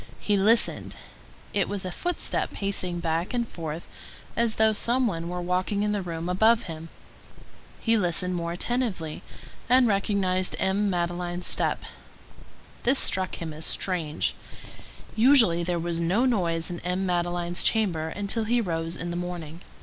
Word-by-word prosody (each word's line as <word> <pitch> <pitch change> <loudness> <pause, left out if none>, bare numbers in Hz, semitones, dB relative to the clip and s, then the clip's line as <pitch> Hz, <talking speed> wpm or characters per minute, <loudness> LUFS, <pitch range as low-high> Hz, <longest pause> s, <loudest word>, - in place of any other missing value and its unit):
He 205 - +1
listened; 215 +4 +2 0.6
it 200 - +1
was 200 -2 -2
a 185 - -3
footstep 355 - -2
pacing 185 -3 -1
back 165 +6 -1
and 235 -1 0
forth, 160 -3 -6 0.5
as 230 -1 +1
though 220 0 +4
some 245 +4 +2
one 170 -6 -2
were 180 0 -4
walking 185 +3 0
in 210 - 0
the 205 -1 -1
room 170 -2 -5
above 220 +6 +3
him. 165 -1 -8 0.9
He 230 0 +2
listened 180 0 0
more 170 -1 -2
attentively, 185 -5 -2 0.5
and 255 0 +6
recognized 195 -3 +1
M. 200 +2 +1
Madeleine's 175 0 -2
step. - - +1 1.0
This 265 +3 +3
struck 185 -6 +3
him 160 -2 -6
as 155 +1 -5
strange; 165 -5 -1 0.8
usually, 225 -8 +5
there 175 0 -1
was 170 0 -2
no 185 +9 +2
noise 170 -9 +1
in 175 - -5
M. 180 +2 -2
Madeleine's 175 -1 0
chamber 180 -8 +1
until 205 +5 -1
he 240 +2 +2
rose 165 -5 -1
in 175 0 -4
the - - -4
morning. 175 -2 -6
180 Hz, 150 wpm, -26 LUFS, 170-210 Hz, 1.0 s, and